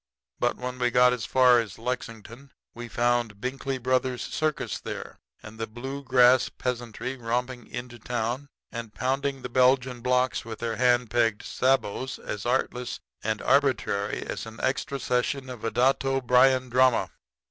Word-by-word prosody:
But 120 - +1
when 125 0 -5
we 125 0 +2
got 125 +1 +5
as 120 -5 -3
far 125 -2 +6
as 110 -5 -4
Lexington 115 +1 -6 0.2
we 120 0 -7
found 120 -3 0
Binkley 135 +2 -3
Brothers' 130 0 0
circus 155 -1 -2
there, - - -7 0.2
and 110 0 -11
the 115 - -2
blue 135 +5 -6
grass 125 -1 +5
peasantry 125 +1 -4
romping 125 +1 -3
into 120 -1 -7
town 120 +4 -3 0.2
and 115 -3 -7
pounding 135 +1 -1
the - - -3
Belgian 125 0 +2
blocks 125 +1 +1
with 110 -1 -7
their 115 -2 -3
hand 125 -2 +3
pegged 115 -3 +1
sabots 130 0 0
as 105 +2 -5
artless 125 -1 -1 0.2
and 110 0 -2
arbitrary 125 -7 +1
as - - -5
an 110 0 -10
extra 140 +1 -1
session 130 +1 -1
of 120 -3 -9
a 115 - 0
Datto 135 +2 +2
Bryan 130 0 +4
drama. 130 0 +3
125 Hz, 155 wpm, -27 LUFS, 115-130 Hz, 0.2 s, far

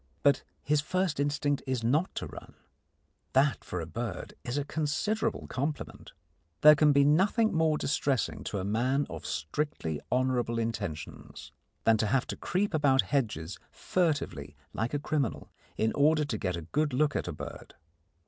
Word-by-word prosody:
But 140 -2 +4 0.2
his 150 0 +2
first 185 0 -1
instinct 145 0 0
is 130 -3 -1
not 150 +10 +1
to - - -3
run. - - -11 0.8
That, 135 +2 +3
for 90 - -4
a 80 - -3
bird, 115 +8 -5
is 120 +3 -3
a 145 - -1
considerable 210 +10 -1
compliment. 145 +3 -4 0.5
There 150 - +10
can 150 0 +4
be 140 0 +5
nothing 195 +10 +3
more 160 -2 +2
distressing 140 -3 0
to 105 - -3
a 95 - -2
man 125 +7 +1
of 80 -2 -6
strictly 80 - -3
honourable 125 -2 +1
intentions 105 -9 -5 0.3
than 115 -1 +5
to 110 - +1
have 125 +4 +2
to - - -2
creep 190 +2 -1
about 140 -4 +4
hedges 105 - -1
furtively 145 - -1 0.2
like 115 +6 -2
a - - 0
criminal 145 -5 -2 0.3
in 110 0 +1
order 150 +1 +3
to 120 -6 -2
get 90 -2 -1
a 85 - -6
good 145 - 0
look 145 +3 +2
at - - -1
a - - -2
bird. - - -9
140 Hz, 165 wpm, -30 LUFS, 115-150 Hz, 0.8 s, There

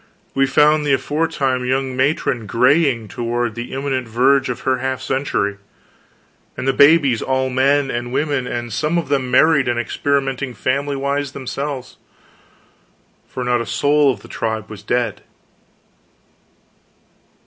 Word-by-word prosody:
we 135 0 +2
found 150 +2 +4
the 145 -2 +1
aforetime 135 -4 -1
young 130 +1 -1
matron 130 -4 0
graying 125 0 +2
toward 120 +1 -2
the 120 +2 -7
imminent 135 -2 -2
verge 130 +4 +2
of 125 - -4
her 130 -1 0
half 130 0 -2
century, 130 -7 -1 1.0
and 130 - -4
the 135 - +3
babies 140 -5 +5
all 130 0 0
men 135 +2 +2
and 120 +1 -4
women, 140 -1 -1
and 120 -2 -4
some 155 +8 0
of 165 -5 -2
them 135 -3 0
married 140 +1 +4
and 120 -1 0
experimenting 135 +1 -1
familywise 140 +1 -1
themselves 135 0 -5 1.3
for 125 - -5
not 125 -1 +1
a - - -4
soul 145 -1 +3
of 105 -5 -7
the - - -13
tribe 110 -1 -4
was 105 - -9
dead! 120 -4 -1
130 Hz, 135 wpm, -19 LUFS, 120-140 Hz, 1.3 s, babies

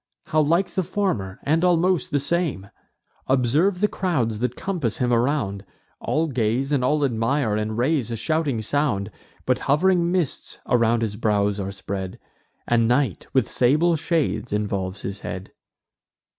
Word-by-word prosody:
How 155 - +2
like 170 +5 +2
the 190 - 0
former, 165 - -2
and 160 +4 +1
almost 180 0 +2
the 145 -4 +1
same! 140 - -1 0.6
Observe 145 +9 +2
the 210 - +4
crowds 130 - -1
that 125 +1 -1
compass 160 - -2
him 125 -1 +1
around; 115 -6 0 0.4
All 160 +2 0
gaze, 130 0 0
and 140 -4 +2
all 145 +3 +2
admire, 115 -1 0
and 110 +1 -2
raise 130 0 +1
a 115 - -2
shouting 145 0 0
sound: 110 -6 0 0.3
But - - +1
hov'ring 175 +3 +3
mists 175 -7 -2
around 115 -1 +2
his 105 -2 -3
brows 105 -2 +1
are 100 0 -3
spread, 95 -1 -5 0.5
And 115 -1 +3
night, 130 +4 0
with 130 -4 +2
sable 155 +7 +3
shades, 160 -5 -1
involves 100 -2 -2
his 100 +1 -4
head." 95 0 -6
125 Hz, 150 wpm, -23 LUFS, 110-160 Hz, 0.6 s, the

